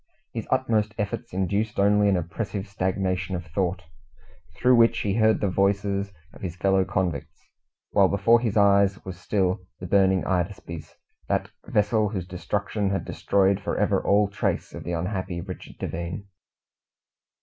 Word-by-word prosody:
His - - -4
utmost 105 -2 +1
efforts 105 -1 -3
induced 100 +4 -1
only 105 +1 +4
an 95 - +3
oppressive 100 +4 -4
stagnation 95 -1 -1
of 90 0 -5
thought, 90 +2 -2 0.7
through 125 0 +4
which 115 -1 +5
he 100 - 0
heard 110 0 +3
the 105 - +2
voices 100 +1 0 0.2
of - - -15
his 90 -3 -4
fellow 95 0 +2
convicts; 90 -7 -3 0.5
while 100 -1 +5
before 115 +5 +4
his 115 -3 -1
eyes 100 0 +4
was 95 -1 -7
still 95 -1 0
the 90 - -6
burning 95 0 +3
Hydaspes 90 -3 -3 0.3
that - - -1 0.2
vessel 105 0 +2
whose 95 -4 -4
destruction 100 +3 -2
had 95 0 -2
destroyed 100 0 +1
for - - -2
ever - - +1
all 100 +1 +4
trace 100 +1 -2
of - - -7
the 85 - -3
unhappy 90 +1 -3
Richard 90 +1 -8
Devine. 85 +4 -5
100 Hz, 150 wpm, -25 LUFS, 90-105 Hz, 0.7 s, which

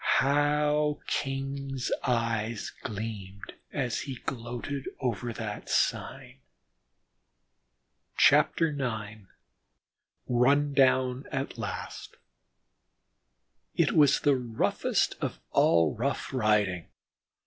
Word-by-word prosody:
How 150 +1 +2
King's 135 -1 -3
eye 115 -2 0 0.2
gleamed 100 -2 -6 0.2
as 125 -5 -1
he 135 - -5
gloated 125 +3 -5
over 120 -1 -2
the 110 -2 -5
sign! 135 -1 -1 1.8
IX 120 -9 +2 1.1
RUN 140 +4 +3
DOWN 130 -1 +3
AT 135 -2 -3
LAST 105 -3 -6 1.6
It - - +3
was 145 -2 +4
the 145 -2 +4
roughest 120 -3 0
of - - -3
all 80 -2 +4
rough 135 +4 -2
riding. 105 -7 +1
125 Hz, 80 wpm, -28 LUFS, 110-140 Hz, 1.8 s, was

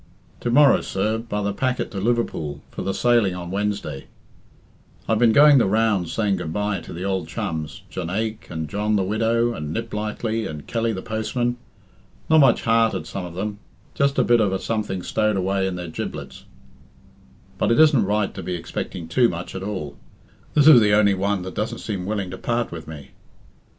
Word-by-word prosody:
"To 120 - -2
morrow, 140 +2 +5
sir, 105 +3 -1
by 105 -3 -3
the 100 0 -1
packet 130 +4 -1
to 100 - -4
Liverpool, 95 -10 -1
for - - -6
the 95 - -1
sailing 115 -4 +2
on 90 -1 -6
Wednesday. 100 -8 -3 1.0
I've 110 -1 +2
been 115 -2 +5
going 145 +3 +7
the 115 - +3
rounds 105 -4 +1
saying 105 -3 0
'goodbye' 100 +4 -2
to - - -11
the 90 +3 -5
ould 95 -4 -1
chums 85 -3 -4
Jonaique, 100 +7 -3
and 80 -1 -4
John 105 +6 -1
the 100 - +2
Widow, 115 +4 +1
and 75 -7 -5
Niplightly, 110 0 -3
and 75 -2 -8
Kelly 115 0 -1
the 95 -3 -5
postman. 120 +3 -2 0.7
Not 160 - +7
much 135 -5 +4
heart 115 0 +3
at - - -4
some 95 -2 -5
of 85 - -11
them; 100 +2 -4 0.3
just 140 0 +1
a - - +4
bit 120 -1 +4
of 100 -3 +2
a 95 - 0
something 105 -3 -3
stowed 110 -2 0
away 95 +1 0
in 95 - -3
their 90 -1 -5
giblets; 80 - -7 1.1
but - - +2
it 115 - +3
isn't 150 -7 +6
right 105 0 0
to - - -6
be 90 - -3
expecting 85 0 -5
too 120 +8 +3
much 85 +1 -6
at 95 - -5
all. 95 -8 -5 0.6
This 145 - +5
is 150 -6 +9
the 105 -1 +3
only 105 -1 +5
one 100 0 -1
that 95 0 -6
doesn't 105 - -3
seem 95 -4 -4
willing 100 -3 -2
to 95 - -7
part 120 0 -1
with 80 -2 -8
me." 75 -3 -10
105 Hz, 195 wpm, -23 LUFS, 95-115 Hz, 1.1 s, is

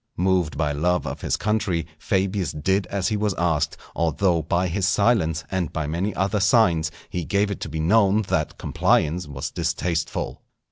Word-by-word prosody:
Moved 90 -3 +1
by 75 -2 +1
love 90 +5 0
of - - -5
his - - 0
country 100 -6 0
Fabius 95 -2 0
did 95 +6 0
as 100 0 -1
he 110 - 0
was 105 -2 0
asked, 85 -3 0 0.2
although 85 +1 +1
by 85 +4 0
his 95 +2 0
silence, 95 -6 +2
and 90 -5 -1
by 80 - -2
many 85 +7 -2
other 100 +3 0
signs, 95 -7 +3 0.2
he 90 - -3
gave 100 +4 +1
it 100 - -4
to - - -4
be 80 +1 -4
known 100 +5 +3
that - - -1
compliance 80 +2 +1
was 70 -2 -5
distasteful. 85 -1 -2
90 Hz, 175 wpm, -23 LUFS, 80-100 Hz, 0.2 s, signs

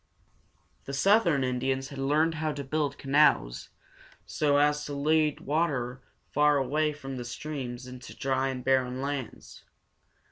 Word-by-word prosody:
The 140 - -6
southern 175 -5 +3
Indians 130 +1 -1
had 140 - -8
learned 150 +4 +2
how 155 -1 -2
to 145 - -5
build 145 0 -1
canals, 135 - +2 0.6
so 145 -2 +1
as 150 0 +2
to 145 - -5
lead 155 +1 +2
the - - -15
water 135 -5 -1 0.3
far 150 0 +4
away 150 +3 +1
from 135 -2 -7
the 125 - -4
streams 125 0 -6
into 125 -1 -10
dry 135 0 0
and 130 -2 -4
barren 130 -1 +1
lands. 140 -4 -6
140 Hz, 145 wpm, -28 LUFS, 130-150 Hz, 0.6 s, far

